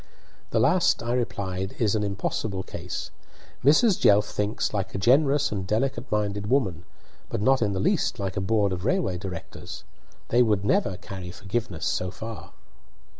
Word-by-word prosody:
"The - - +1
last," 160 +7 +3
I 120 +1 -1
replied, 95 -6 -2
"is 110 -4 +2
an 110 - +1
impossible 100 -1 -2
case. 90 -1 -6 0.5
Mrs. 175 - +5
Jelf 105 +1 +6
thinks 105 +1 -2
like 95 -2 -2
a - - 0
generous 140 +7 +3
and 95 -3 -3
delicate 130 +4 -1
minded 105 -1 -1
woman, 95 - +1 0.4
but - - -2
not 130 +4 +3
in 105 -2 +1
the 95 - -2
least - - +1
like 95 -2 -3
a 100 - -1
board 100 0 +2
of 90 0 -4
railway 135 - 0
directors. 90 -3 -7 0.5
They 120 - +4
would 105 -4 +2
never 95 -2 +1
carry 95 -1 -8
forgiveness 95 -1 -4
so 90 - 0
far." 110 +5 -8
105 Hz, 165 wpm, -26 LUFS, 95-120 Hz, 0.5 s, Jelf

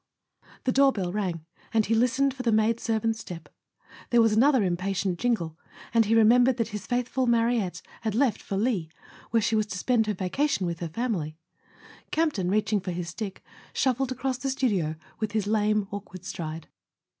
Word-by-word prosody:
The 255 - +1
doorbell 255 -10 +3
rang, 180 -6 -2 0.3
and 220 -2 +2
he 225 - +1
listened 255 +4 +2
for 260 - -6
the 245 - +1
maid¬ 220 +1 +3
servant's 225 0 0
step. 170 -6 -8 0.6
There 240 - +4
was 225 -2 +5
another 260 +1 +4
impatient 185 0 -1
jingle, 175 -10 -1 0.3
and 230 -1 +5
he 225 +2 +2
remembered 240 +3 +5
that 230 -2 -1
his 210 -2 -6
faithful 250 +1 0
Mariette 230 -5 +1 0.2
had 220 -2 -2
left 245 -3 +2
for 195 - -4
Lille, 205 -6 0 0.4
where 230 0 +2
she 225 0 +1
was 215 -1 +1
to 185 - -5
spend 225 +2 +2
her 210 - 0
vacation 195 +4 0
with 170 -1 -3
her 170 - -4
family. 165 -7 -2 0.7
Campton, 295 - 0
reaching 210 +1 +2
for 190 - -6
his 175 -1 -3
stick, 195 +1 -6 0.3
shuffled 260 0 +1
across 255 0 -2
the 270 - -2
studio 200 - 0 0.2
with 215 -1 -2
his 215 -3 0
lame 210 -1 +1
awkward 190 -3 -8
stride. 160 -2 -5
220 Hz, 180 wpm, -27 LUFS, 190-245 Hz, 0.7 s, was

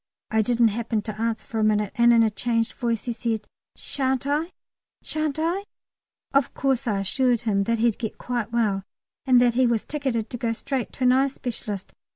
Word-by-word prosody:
I 220 0 +3
didn't 235 +1 +3
happen 225 0 -2
to 215 0 -6
answer 230 -1 -1
for 225 - -4
a - - +2
minute, 210 -1 +2
and 235 0 +5
in 230 -1 +6
a 220 - +2
changed 230 +1 0
voice 235 -3 -1
he 240 - -2
said, 225 -2 -2 0.3
"Shan't 265 -1 -1
I? 300 +5 0 0.5
shan't 310 -2 -1
I?" 345 +5 -1 0.7
Of 275 -2 +2
course 270 -1 0
I 200 -3 +1
assured 245 +3 +1
him 205 -4 +1
he'd 230 -1 +1
get 220 -3 -4
quite 240 -3 -3
well, 215 -5 +1 0.5
and 255 -2 +6
that 245 -1 +4
he 255 +1 +3
was 230 -2 +1
ticketed 260 -7 -2
to 245 - -4
go 230 -1 -1
straight 260 +2 -3
to 260 - -4
an 250 - +6
eye 265 +2 +4
specialist. 220 -7 -5
235 Hz, 200 wpm, -25 LUFS, 220-260 Hz, 0.7 s, in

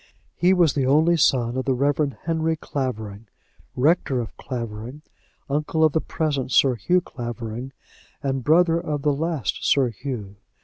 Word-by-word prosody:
He 180 +2 +3
was 175 -5 +4
the 135 -3 0
only 160 +5 +4
son 125 -6 +2
of 130 - -2
the 130 - +1
Reverend 140 +1 0
Henry 160 -1 0
Clavering, 115 -8 -5 0.5
rector 140 -1 +2
of 115 -3 -5
Clavering, 120 +3 -6 0.4
uncle 150 +2 0
of 155 -2 +4
the 160 - +1
present 140 -5 -2
Sir 135 -2 +4
Hugh 175 - +1
Clavering, 120 -2 -6 0.5
and 135 -2 -1
brother 165 +3 +4
of 150 -4 -3
the 150 -1 +3
last 150 - -2
Sir 135 -3 +3
Hugh. 110 -4 -6
140 Hz, 150 wpm, -23 LUFS, 120-160 Hz, 0.5 s, was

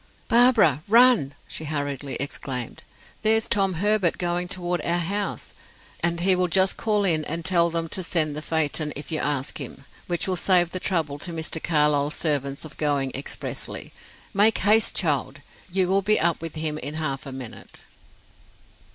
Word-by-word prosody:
"Barbara, 230 - +5
run," 230 - +5
she 160 - -5
hurriedly 145 -2 -3
exclaimed. 130 -3 -5 0.4
"There's 220 +1 +2
Tom 195 -3 +2
Herbert 200 0 +1
going 175 0 -1
toward 180 -1 -2
our 170 +1 +1
house, 200 +4 -3 0.5
and 170 0 -1
he 185 +1 +4
will 180 0 +1
just 190 +3 +3
call 210 -2 +1
in 160 -4 +2
and 165 +1 -3
tell 170 -2 +3
them 165 0 -2
to 190 - -1
send 160 -4 0
the 150 - -4
phaeton, 155 -1 0
if 145 +4 -7
you 155 - 0
ask 140 -1 -2
him, 135 +1 -8 0.2
which 175 +1 -1
will 185 - 0
save 175 -1 +3
the 185 - -3
trouble 160 -7 -1
to 175 - -4
Mr. 160 -1 -3
Carlyle's 150 -2 +2
servants 140 -2 -1
of 155 - -12
going 145 -3 0
expressly. 135 - -4 0.4
Make 210 +3 +4
haste, 215 +2 +3
child! 145 -4 0 0.3
You 185 0 +1
will 195 +2 +2
be 215 +2 +3
up 170 -1 +1
with 165 -1 -6
him 155 -1 -2
in 145 +2 -4
half 140 -4 -3
a - - -6
minute." 130 -3 -9
165 Hz, 170 wpm, -24 LUFS, 145-190 Hz, 0.5 s, Barbara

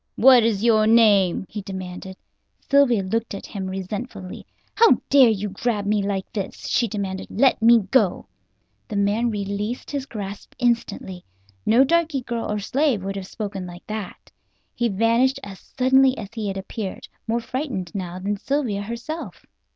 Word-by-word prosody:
"What 255 0 +7
is 220 -2 0
your 215 -2 +4
name?" 205 -6 +4
he 210 - -6
demanded. 190 -1 -7 0.4
Sylvia 260 -7 +3
looked 225 +3 -2
at 195 - -8
him 195 -2 -5
resentfully. 195 +1 -6 0.3
"How 460 0 +6
dare 270 -4 +7
you 210 -1 -1
grab 205 +1 -2
me 210 0 +1
like 195 -1 -3
this?" 200 -3 -5
she 245 -2 +1
demanded. 195 -2 -4
"Let 260 +3 +2
me 230 0 +6
go." 260 - +2 0.6
The 215 - -6
man 205 +4 +1
released 205 +3 -4
his 280 -2 -3
grasp 200 -4 -7
instantly. 230 -7 -1 0.4
No 240 +4 +6
darky 320 -1 +1
girl 235 -3 -4
or 210 - -1
slave 245 +1 0
would 195 0 -4
have 195 -1 -6
spoken 200 -4 -5
like 175 0 -11
that. 215 -3 -7 0.4
He 240 - 0
vanished 230 +6 +2
as 195 -2 -9
suddenly 265 0 +3
as 200 - -6
he 220 -2 -4
had 195 -1 -3
appeared, 195 +1 -6 0.2
more 230 +1 +1
frightened 235 - -4
now 180 -3 -5
than 200 +2 -2
Sylvia 245 -4 -1
herself. 235 - -6
215 Hz, 160 wpm, -23 LUFS, 195-245 Hz, 0.6 s, What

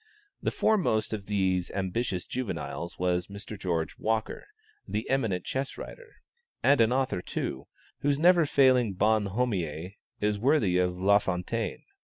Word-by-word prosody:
The - - +1
foremost 110 - +1
of 100 -2 -5
these 95 -3 +1
ambitious 95 0 -2
juveniles 85 - -4
was 90 -1 0
Mr. 100 +2 -8
George 85 -5 -2
Walker, 110 0 -2 0.4
the 110 +2 -3
eminent 110 -10 0
Chess 135 +1 -3
writer, 485 -1 -11 0.4
and 140 -2 +5
an 115 +1 +4
author, 130 -8 0
too, - - -4 0.3
whose 140 0 +1
never 170 -1 +5
failing 130 -7 +4
bonhommie 100 -5 0 0.2
is 105 0 0
worthy 110 -8 +3
of 90 0 0
Lafontaine. 100 +2 +1
105 Hz, 130 wpm, -28 LUFS, 90-125 Hz, 0.4 s, and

